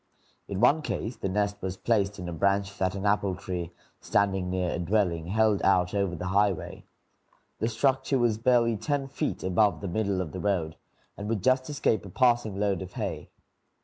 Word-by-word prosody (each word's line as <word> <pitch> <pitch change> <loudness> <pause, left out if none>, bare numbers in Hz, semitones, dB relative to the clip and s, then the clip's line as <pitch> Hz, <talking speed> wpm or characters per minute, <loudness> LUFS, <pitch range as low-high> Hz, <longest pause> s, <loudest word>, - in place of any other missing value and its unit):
In 95 - -4
one 155 +2 +5
case, 120 -4 -3
the 95 - -3
nest 100 +1 0
was 95 0 -4
placed 100 -3 0
in 90 -2 -6
a 85 - -4
branch 100 +3 +1
that 95 0 0
an 100 +1 -4
apple 100 -2 +1
tree, 85 -1 -4 0.3
standing 95 -3 +1
near 90 -1 -1
a - - -3
dwelling, 90 -3 0
held 110 +1 +2
out 90 -2 +3
over 100 -3 0
the 90 +2 -4
highway. 100 -1 0 0.7
The 110 - 0
structure 135 +4 +1
was 120 -3 +1
barely 115 -2 +3
ten 140 +4 -1
feet 145 +3 -3
above 100 +3 +2
the 100 - -5
middle 100 0 -1
of 90 -5 -3
the 95 - -6
road, 90 -6 -1 0.4
and 105 +1 -6
would 110 -5 -1
just 130 +2 +2
escape 140 -7 0
a 100 - -9
passing 120 -2 +2
load 100 -2 0
of 95 0 -8
hay. - - -4
100 Hz, 190 wpm, -27 LUFS, 95-110 Hz, 0.7 s, one